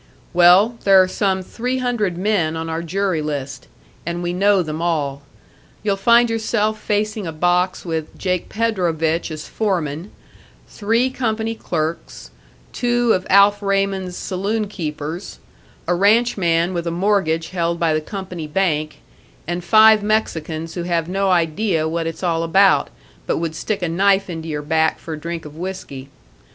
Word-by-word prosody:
"Well, 180 Hz, +7 st, +5 dB
there 195 Hz, -1 st, +6 dB
are 185 Hz, -, +5 dB
some 190 Hz, -1 st, -1 dB
three 250 Hz, +7 st, -3 dB
hundred 235 Hz, -8 st, -1 dB
men 180 Hz, -5 st, 0 dB
on 165 Hz, 0 st, -4 dB
our 160 Hz, +1 st, -2 dB
jury 180 Hz, 0 st, -1 dB
list, 135 Hz, -4 st, -5 dB, 0.4 s
and 170 Hz, +1 st, -4 dB
we 175 Hz, 0 st, -2 dB
know 195 Hz, +1 st, +3 dB
them 155 Hz, 0 st, -5 dB
all. 145 Hz, -5 st, -1 dB, 0.6 s
You'll 205 Hz, -2 st, +1 dB
find 235 Hz, +4 st, +4 dB
yourself 220 Hz, -1 st, -1 dB
facing 210 Hz, -2 st, -1 dB
a -, -, -3 dB
box 180 Hz, +4 st, 0 dB
with 160 Hz, -2 st, -4 dB
Jake 180 Hz, -2 st, -2 dB
Predovich 175 Hz, -8 st, 0 dB
as 155 Hz, -1 st, -7 dB
foreman, 175 Hz, -5 st, -2 dB, 0.6 s
three 230 Hz, +5 st, 0 dB
company 225 Hz, -3 st, -2 dB
clerks, 155 Hz, -, -4 dB, 0.4 s
two 240 Hz, -1 st, +2 dB
of 185 Hz, -, -2 dB
Alf 200 Hz, +1 st, +5 dB
Raymond's 195 Hz, -2 st, -1 dB
saloon 205 Hz, +3 st, -2 dB
keepers, 160 Hz, -2 st, -6 dB, 0.5 s
a -, -, +2 dB
ranchman 190 Hz, -4 st, +2 dB
with 170 Hz, -1 st, -3 dB
a -, -, +1 dB
mortgage 170 Hz, -3 st, 0 dB
held 170 Hz, -2 st, -1 dB
by 165 Hz, -1 st, +2 dB
the 155 Hz, -, 0 dB
company 180 Hz, -2 st, -6 dB
bank, 155 Hz, -3 st, -1 dB, 0.4 s
and 175 Hz, +2 st, -3 dB
five 215 Hz, +3 st, +6 dB
Mexicans 165 Hz, -7 st, -2 dB
who 175 Hz, -, -4 dB
have 170 Hz, -1 st, -1 dB
no 195 Hz, +1 st, 0 dB
idea 170 Hz, -1 st, +1 dB
what 165 Hz, +1 st, -2 dB
it's 165 Hz, -, -6 dB
all 165 Hz, -2 st, +1 dB
about, 190 Hz, +4 st, +3 dB, 0.4 s
but -, -, 0 dB
would 165 Hz, -1 st, -2 dB
stick 200 Hz, +4 st, -3 dB
a -, -, +1 dB
knife 195 Hz, +3 st, +2 dB
into 165 Hz, -1 st, -6 dB
your 150 Hz, -2 st, -4 dB
back 160 Hz, +1 st, +1 dB
for 165 Hz, -, -7 dB
a 155 Hz, -, -6 dB
drink 170 Hz, 0 st, -5 dB
of 150 Hz, 0 st, -10 dB
whiskey. 160 Hz, -6 st, -7 dB
180 Hz, 160 wpm, -20 LUFS, 165-205 Hz, 0.6 s, there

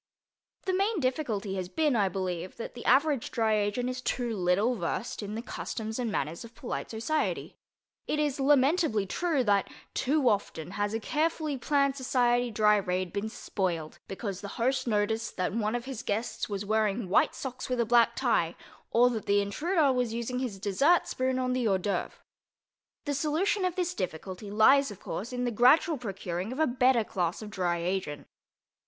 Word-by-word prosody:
The 375 Hz, -, 0 dB
main 395 Hz, +2 st, +1 dB
difficulty 250 Hz, -8 st, -1 dB
has 180 Hz, -1 st, -4 dB
been, 300 Hz, -, +1 dB
I 200 Hz, -4 st, +3 dB
believe, 185 Hz, -1 st, -4 dB
that 230 Hz, -, -6 dB
the 240 Hz, -, -9 dB
average 285 Hz, -3 st, +3 dB
dry 225 Hz, -2 st, +1 dB
agent 210 Hz, +4 st, 0 dB
is 255 Hz, 0 st, -3 dB
too 240 Hz, -3 st, -1 dB
little 190 Hz, +6 st, +2 dB
versed 185 Hz, +4 st, -3 dB
in 205 Hz, +1 st, -5 dB
the 230 Hz, -, -4 dB
customs 220 Hz, -2 st, -5 dB
and 235 Hz, -3 st, -1 dB
manners 160 Hz, -, -2 dB
of 230 Hz, 0 st, -13 dB
polite 240 Hz, -, -5 dB
society. 235 Hz, +8 st, -2 dB, 0.5 s
It -, -, 0 dB
is 295 Hz, -2 st, 0 dB
lamentably 275 Hz, -, +3 dB
true 305 Hz, -, 0 dB
that, 200 Hz, -3 st, +2 dB, 0.2 s
too 280 Hz, 0 st, +1 dB
often, 190 Hz, -6 st, 0 dB
has 205 Hz, +2 st, -1 dB
a -, -, 0 dB
carefully 310 Hz, +3 st, -1 dB
planned 280 Hz, +1 st, +1 dB
society 245 Hz, -2 st, +2 dB
dry 210 Hz, -1 st, +4 dB
raid 185 Hz, -2 st, -2 dB
been 205 Hz, +2 st, -2 dB
spoiled 175 Hz, -7 st, -3 dB
because 195 Hz, -1 st, -5 dB
the 200 Hz, -, -6 dB
host 255 Hz, +2 st, +1 dB
noticed 220 Hz, +1 st, 0 dB
that 185 Hz, 0 st, -1 dB
one 220 Hz, 0 st, 0 dB
of 240 Hz, 0 st, -3 dB
his 265 Hz, -4 st, -5 dB
guests 225 Hz, +3 st, -2 dB
was 200 Hz, 0 st, -3 dB
wearing 215 Hz, 0 st, +1 dB
white 185 Hz, -, +3 dB
socks 260 Hz, -1 st, -6 dB
with 250 Hz, -1 st, -1 dB
a 235 Hz, -, +3 dB
black 235 Hz, 0 st, +4 dB
tie, -, -, +1 dB, 0.3 s
or 240 Hz, +2 st, +5 dB
that 220 Hz, -3 st, -4 dB
the 200 Hz, 0 st, +4 dB
intruder 295 Hz, -, +1 dB
was 245 Hz, -3 st, 0 dB
using 235 Hz, +2 st, -2 dB
his 245 Hz, -6 st, -3 dB
dessert 245 Hz, -, +3 dB
spoon 255 Hz, 0 st, -1 dB
on 255 Hz, -1 st, 0 dB
the 250 Hz, -2 st, +1 dB
hors 195 Hz, -2 st, +3 dB
d'œuvres. 190 Hz, -1 st, -2 dB, 0.9 s
The 290 Hz, -, -1 dB
solution 325 Hz, +8 st, +1 dB
of 360 Hz, -1 st, -1 dB
this 360 Hz, -1 st, -1 dB
difficulty 185 Hz, -, -5 dB
lies, 270 Hz, +7 st, +5 dB
of 205 Hz, -, -9 dB
course, 225 Hz, +6 st, -5 dB
in 250 Hz, 0 st, -2 dB
the 245 Hz, -, 0 dB
gradual 260 Hz, -, +4 dB
procuring 195 Hz, -3 st, -4 dB
of 260 Hz, -, -5 dB
a 315 Hz, -, +3 dB
better 250 Hz, -2 st, +3 dB
class 180 Hz, 0 st, -2 dB
of 210 Hz, -, -8 dB
dry 180 Hz, -4 st, 0 dB
agent. 170 Hz, -4 st, -3 dB
230 Hz, 185 wpm, -29 LUFS, 200-265 Hz, 0.9 s, or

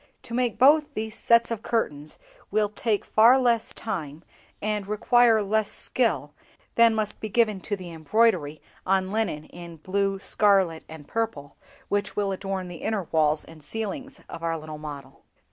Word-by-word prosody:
To 230 Hz, -, -9 dB
make 245 Hz, -2 st, 0 dB
both 295 Hz, +3 st, +4 dB
these 220 Hz, 0 st, -4 dB
sets 235 Hz, 0 st, +3 dB
of 225 Hz, -2 st, -3 dB
curtains 150 Hz, -12 st, -2 dB, 0.3 s
will 210 Hz, 0 st, +1 dB
take 210 Hz, 0 st, -1 dB
far 230 Hz, +4 st, +6 dB
less 235 Hz, -3 st, +1 dB
time, 165 Hz, -8 st, -5 dB, 0.4 s
and 210 Hz, -1 st, -2 dB
require 225 Hz, +1 st, +4 dB
less 215 Hz, +1 st, 0 dB
skill, -, -, -1 dB, 0.4 s
than 230 Hz, -1 st, +5 dB
must 215 Hz, -1 st, -2 dB
be 215 Hz, -, -5 dB
given 215 Hz, -2 st, +1 dB
to 205 Hz, -, -2 dB
the 180 Hz, -3 st, -9 dB
embroidery 165 Hz, -2 st, +1 dB, 0.2 s
on 190 Hz, 0 st, +1 dB
linen 210 Hz, -9 st, -1 dB
in 170 Hz, -1 st, -11 dB
blue, 195 Hz, +4 st, -1 dB
scarlet, 195 Hz, -5 st, +2 dB
and 155 Hz, -2 st, -11 dB
purple, 220 Hz, -12 st, -3 dB, 0.3 s
which 205 Hz, 0 st, -1 dB
will 200 Hz, -1 st, 0 dB
adorn 195 Hz, -1 st, -4 dB
the 175 Hz, -1 st, -8 dB
inner 215 Hz, +2 st, -2 dB
walls 155 Hz, -1 st, +2 dB
and 160 Hz, -2 st, -14 dB
ceilings 260 Hz, -, -5 dB
of 165 Hz, -, -8 dB
our 165 Hz, 0 st, -1 dB
little 155 Hz, -1 st, -8 dB
model." 145 Hz, -3 st, -9 dB
200 Hz, 160 wpm, -25 LUFS, 165-225 Hz, 0.4 s, far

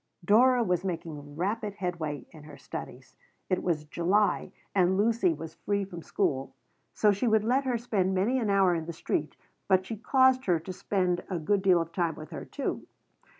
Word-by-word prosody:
Dora 245 Hz, +5 st, +5 dB
was 180 Hz, -4 st, 0 dB
making 155 Hz, -5 st, -5 dB
rapid 205 Hz, +4 st, -2 dB
headway 165 Hz, -, -4 dB
in 155 Hz, -3 st, -13 dB
her 150 Hz, -2 st, -11 dB
studies. -, -, -9 dB, 0.4 s
It 185 Hz, -, +2 dB
was 160 Hz, -4 st, -1 dB
July 185 Hz, +7 st, +1 dB, 0.2 s
and 185 Hz, -1 st, +3 dB
Lucy 220 Hz, -3 st, +3 dB
was 160 Hz, 0 st, -6 dB
free 200 Hz, -1 st, -2 dB
from 175 Hz, -3 st, -9 dB
school, 135 Hz, -3 st, -1 dB, 0.4 s
so 210 Hz, -, +3 dB
she 200 Hz, +5 st, 0 dB
would 220 Hz, -1 st, +3 dB
let 260 Hz, +5 st, +1 dB
her 250 Hz, -2 st, +1 dB
spend 195 Hz, -5 st, 0 dB
many 225 Hz, +8 st, +2 dB
an 220 Hz, -4 st, -1 dB
hour 195 Hz, -2 st, +4 dB
in 165 Hz, -1 st, -3 dB
the 170 Hz, -, -4 dB
street, 155 Hz, -1 st, -2 dB, 0.3 s
but 190 Hz, -1 st, +3 dB
she 225 Hz, -, -5 dB
caused 260 Hz, +3 st, +3 dB
her 175 Hz, -3 st, +2 dB
to 185 Hz, +4 st, -7 dB
spend 180 Hz, -2 st, 0 dB
a 185 Hz, -, -1 dB
good 195 Hz, +5 st, +1 dB
deal 185 Hz, -2 st, +4 dB
of 165 Hz, 0 st, -3 dB
time 170 Hz, -4 st, 0 dB
with 155 Hz, 0 st, -10 dB
her, -, -, -6 dB
too. -, -, -4 dB
185 Hz, 195 wpm, -28 LUFS, 165-210 Hz, 0.4 s, Dora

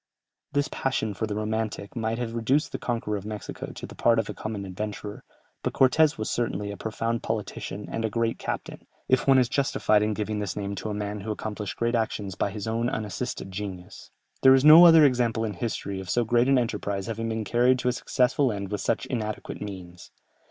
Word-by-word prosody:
This 145 Hz, +1 st, +1 dB
passion 130 Hz, -7 st, -1 dB
for 110 Hz, +3 st, -3 dB
the 105 Hz, -, -3 dB
romantic 110 Hz, -1 st, -3 dB
might 115 Hz, -1 st, -1 dB
have 120 Hz, -2 st, -3 dB
reduced 125 Hz, +6 st, +1 dB
the -, -, -4 dB
conqueror 115 Hz, -3 st, -2 dB
of 100 Hz, -, -7 dB
Mexico 105 Hz, 0 st, -6 dB
to -, -, -8 dB
the -, -, -11 dB
part 115 Hz, -1 st, +3 dB
of 115 Hz, -2 st, 0 dB
a -, -, -7 dB
common 110 Hz, -2 st, -5 dB
adventurer, 105 Hz, +2 st, -6 dB, 0.4 s
but -, -, -2 dB
Cortès 150 Hz, +3 st, +4 dB
was 110 Hz, -, -3 dB
certainly 105 Hz, -4 st, -2 dB
a -, -, -6 dB
profound 115 Hz, +2 st, -2 dB
politician 105 Hz, -2 st, -4 dB
and 115 Hz, -, -3 dB
a 110 Hz, -, 0 dB
great 115 Hz, +1 st, -1 dB
captain, -, -, -5 dB, 0.2 s
if 130 Hz, +1 st, +2 dB
one 135 Hz, -1 st, +6 dB
is 125 Hz, -2 st, +4 dB
justified 125 Hz, -5 st, +2 dB
in 105 Hz, 0 st, 0 dB
giving 105 Hz, 0 st, -2 dB
this 100 Hz, -4 st, -3 dB
name 100 Hz, -1 st, -3 dB
to 100 Hz, +2 st, -5 dB
a -, -, -2 dB
man 105 Hz, 0 st, -3 dB
who 105 Hz, +2 st, -7 dB
accomplished 105 Hz, -1 st, -5 dB
great 115 Hz, +1 st, 0 dB
actions 110 Hz, -4 st, -1 dB
by 95 Hz, -, -1 dB
his 100 Hz, 0 st, -6 dB
own 115 Hz, +2 st, 0 dB
unassisted 105 Hz, -4 st, -4 dB
genius. 95 Hz, -2 st, -7 dB, 0.3 s
There 130 Hz, 0 st, +8 dB
is 135 Hz, +2 st, +2 dB
no 165 Hz, +3 st, +11 dB
other 165 Hz, -2 st, +8 dB
example 120 Hz, -4 st, +2 dB
in 105 Hz, -, -3 dB
history 100 Hz, -1 st, -4 dB
of 95 Hz, -1 st, -8 dB
so 120 Hz, +5 st, +2 dB
great 120 Hz, +2 st, +3 dB
an 135 Hz, -, +5 dB
enterprise 100 Hz, -5 st, -2 dB
having 115 Hz, +1 st, -3 dB
been 110 Hz, 0 st, -2 dB
carried 120 Hz, +4 st, +3 dB
to 125 Hz, -, -3 dB
a -, -, +4 dB
successful 125 Hz, +1 st, +1 dB
end 100 Hz, -1 st, -5 dB
with 105 Hz, -, -2 dB
such -, -, 0 dB
inadequate 110 Hz, -4 st, -4 dB
means. 90 Hz, -4 st, -8 dB
110 Hz, 215 wpm, -26 LUFS, 105-120 Hz, 0.4 s, no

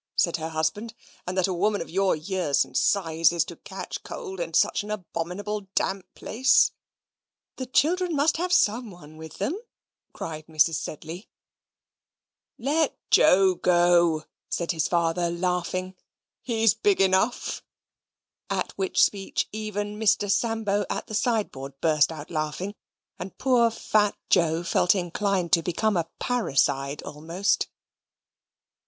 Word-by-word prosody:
said 170 Hz, -, +2 dB
her 160 Hz, 0 st, -4 dB
husband, 160 Hz, +9 st, -2 dB, 0.3 s
"and 180 Hz, +1 st, -3 dB
that 185 Hz, -, +3 dB
a 190 Hz, -, -1 dB
woman 205 Hz, +4 st, +1 dB
of -, -, -5 dB
your 190 Hz, +2 st, +1 dB
years 160 Hz, -2 st, 0 dB
and -, -, -18 dB
size 165 Hz, -4 st, +3 dB
is 170 Hz, -1 st, +1 dB
to -, -, -9 dB
catch -, -, -7 dB
cold, 390 Hz, -5 st, -7 dB
in -, -, -3 dB
such -, -, +2 dB
an 205 Hz, -, -9 dB
abominable 195 Hz, +1 st, -4 dB
damp 190 Hz, -1 st, -1 dB
place?" 260 Hz, +4 st, +3 dB, 0.9 s
"The 260 Hz, -, -5 dB
children 340 Hz, +6 st, +2 dB
must 295 Hz, +3 st, +2 dB
have 360 Hz, +2 st, -2 dB
someone 205 Hz, -, 0 dB
with 160 Hz, -1 st, -10 dB
them," 265 Hz, -, -1 dB, 0.6 s
cried 155 Hz, -1 st, -7 dB
Mrs. 160 Hz, +1 st, +3 dB
Sedley. 165 Hz, +6 st, -7 dB, 1.3 s
"Let 285 Hz, +4 st, 0 dB
Joe 190 Hz, 0 st, +6 dB
go," 175 Hz, -3 st, +3 dB, 0.3 s
said 170 Hz, 0 st, -1 dB
his 160 Hz, -3 st, 0 dB
father, 170 Hz, 0 st, +1 dB
laughing. 180 Hz, +1 st, -2 dB, 0.5 s
"He's 225 Hz, -3 st, +2 dB
big 205 Hz, -3 st, +1 dB
enough." 195 Hz, +5 st, +1 dB, 0.9 s
At -, -, -2 dB
which 380 Hz, -1 st, +1 dB
speech 195 Hz, -2 st, 0 dB
even 210 Hz, -1 st, -4 dB
Mr. 205 Hz, -2 st, +2 dB
Sambo 215 Hz, -1 st, 0 dB
at -, -, -3 dB
the -, -, -10 dB
sideboard 200 Hz, -, -2 dB
burst 155 Hz, -1 st, +3 dB
out 155 Hz, -2 st, -9 dB
laughing, 155 Hz, +5 st, -3 dB, 0.5 s
and 185 Hz, +2 st, -7 dB
poor 245 Hz, -3 st, +3 dB
fat 215 Hz, -2 st, +1 dB
Joe 165 Hz, -1 st, +3 dB
felt 175 Hz, +2 st, +3 dB
inclined 185 Hz, 0 st, -1 dB
to 170 Hz, -, +6 dB
become 195 Hz, +5 st, 0 dB
a 165 Hz, -1 st, -1 dB
parricide 140 Hz, -, 0 dB
almost. 165 Hz, +6 st, -1 dB
185 Hz, 135 wpm, -26 LUFS, 165-215 Hz, 1.3 s, Joe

